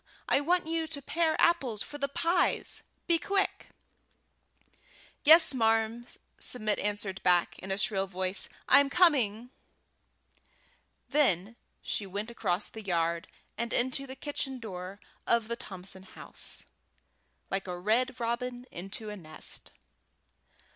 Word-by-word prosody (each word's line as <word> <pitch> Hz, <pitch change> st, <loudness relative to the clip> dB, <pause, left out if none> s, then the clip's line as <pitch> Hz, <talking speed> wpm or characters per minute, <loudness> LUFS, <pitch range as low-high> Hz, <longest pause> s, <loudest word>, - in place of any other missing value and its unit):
I 275 Hz, -, +3 dB
want 350 Hz, +4 st, +2 dB
you 325 Hz, 0 st, -1 dB
to 310 Hz, -3 st, -3 dB
pare 320 Hz, +2 st, 0 dB
apples 265 Hz, -11 st, +2 dB
for 290 Hz, -, -9 dB
the 280 Hz, -, 0 dB
pies. 335 Hz, +5 st, +1 dB, 0.2 s
Be 335 Hz, -2 st, +3 dB
quick!" 390 Hz, +5 st, 0 dB, 1.6 s
"Yes, 320 Hz, +1 st, +8 dB
marm," 225 Hz, 0 st, +1 dB, 0.3 s
Submit 215 Hz, -4 st, +2 dB
answered 205 Hz, -2 st, -1 dB
back, 175 Hz, -1 st, +2 dB
in 190 Hz, -, -8 dB
a 195 Hz, -, -1 dB
shrill 195 Hz, -2 st, +1 dB
voice; 185 Hz, 0 st, -1 dB, 0.2 s
"I'm 280 Hz, +1 st, +6 dB
coming!" 250 Hz, -, +3 dB, 1.6 s
Then 225 Hz, -, +2 dB, 0.3 s
she 205 Hz, -, -2 dB
went 205 Hz, +4 st, -4 dB
across 185 Hz, -4 st, -1 dB
the 220 Hz, -, -9 dB
yard 170 Hz, -2 st, 0 dB, 0.3 s
and 235 Hz, 0 st, -1 dB
into 260 Hz, +3 st, +1 dB
the 260 Hz, -, -7 dB
kitchen 270 Hz, -2 st, -4 dB
door 190 Hz, -3 st, -7 dB, 0.3 s
of 235 Hz, -2 st, +2 dB
the 235 Hz, -, -2 dB
Thompson 190 Hz, -5 st, -8 dB
house, 190 Hz, -, -7 dB, 0.9 s
like 195 Hz, 0 st, -1 dB
a 180 Hz, -1 st, -4 dB
red 240 Hz, +7 st, +1 dB
robin 245 Hz, +1 st, -2 dB
into 195 Hz, +4 st, -6 dB
a -, -, -5 dB
nest. 155 Hz, -6 st, -6 dB
230 Hz, 125 wpm, -30 LUFS, 195-280 Hz, 1.6 s, Yes